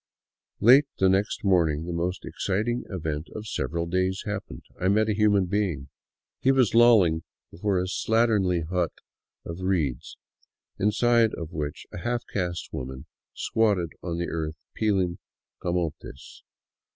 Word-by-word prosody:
Late 130 +6 +7
the 95 - +4
next 95 +2 0
morning 85 -5 +2
the 85 - -4
most 90 +2 -2
exciting 110 +5 -1
event 80 -4 -3
of 110 - -6
several 85 -5 -2
days 95 +2 0
hap 105 -1 -3
pened,— - - -10 0.2
I 90 - +2
met 110 +3 +3
a - - +2
human 105 -2 +3
being. 90 -8 -1 0.5
He 135 - +3
was 130 -5 +3
lolling 110 -9 +5 0.3
before 95 0 0
a - - 0
slatternly 100 -4 +1
hut 90 -1 0 0.5
of 85 +2 -6
reeds, 80 -10 -1 0.6
inside 115 +2 +3 0.2
which 75 -3 -4
a - - -5
half 120 +3 -2
caste 90 -4 -3
woman 65 0 -6 0.3
squatted 100 -7 +1
on 85 -2 -3
the 85 - -2
earth 80 -1 -3 0.2
peeling 95 -5 0 0.4
camotes. 85 -6 -4
95 Hz, 140 wpm, -26 LUFS, 85-105 Hz, 0.6 s, Late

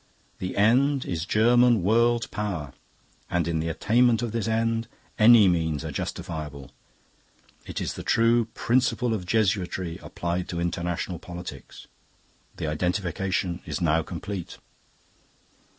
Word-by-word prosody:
The 90 0 -4
end 130 +7 +3
is 85 -1 -3
German 120 0 +4
world 115 +3 +2
power, 95 - -4 0.6
and 85 -2 0
in 85 -1 0
the 80 - -2
attainment 115 +7 +2
of 120 - -2
this 115 -1 -2
end, 115 0 0 0.3
any 110 -2 +8
means 80 -5 0
are - - -4
justifiable. 75 -5 -5 1.0
It - - -4
is - - -3
the - - -7
true 115 0 +3
principle 125 -1 +1
of 95 -5 -4
Jesuitry 95 -5 0
applied 85 +1 -3
to 85 - -3
international 85 0 -2
politics. 85 -7 -9 0.7
"The - - -3
identification 90 +2 -1
is - - -3
now 80 -2 +2
complete. 95 +2 -6
95 Hz, 125 wpm, -26 LUFS, 85-115 Hz, 1.0 s, any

